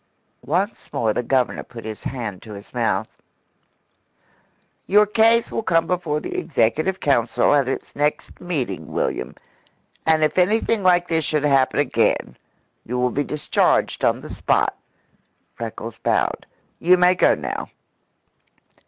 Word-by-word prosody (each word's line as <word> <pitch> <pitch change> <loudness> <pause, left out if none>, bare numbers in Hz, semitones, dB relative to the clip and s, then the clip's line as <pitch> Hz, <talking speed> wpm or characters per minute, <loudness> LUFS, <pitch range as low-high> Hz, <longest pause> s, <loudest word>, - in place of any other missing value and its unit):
Once 190 +8 -2
more 110 -2 0
the - - -1
Governor 130 +1 0
put 115 -2 -11
his 110 -1 -6
hand 115 -8 -5
to 110 - -10
his 100 +1 -12
mouth. 110 -4 0 1.8
"Your 210 +2 +5
case 225 +2 +3
will - - -2
come 165 -6 +2
before 165 -4 -1
the - - -6
executive 155 +5 0
council 125 -3 +2
at 140 -3 +3
its - - -5
next 150 +1 -2
meeting, 125 - -4
William. - - -2 0.7
And 160 -1 +4
if 155 +3 +2
anything 215 +3 +2
like 175 -1 +3
this 160 -2 0
should 150 -1 -1
happen 135 -3 +2
again, - - +1 0.5
you 125 +2 -4
will 125 0 +1
be 145 - 0
discharged 150 +1 0
on - - +2
the - - -9
spot." - - +1 0.8
Freckles 115 0 -7
bowed. - - 0 0.3
"You 180 +2 +5
may 180 0 +5
go 180 - +3
now." - - -5
150 Hz, 140 wpm, -22 LUFS, 120-180 Hz, 1.8 s, Your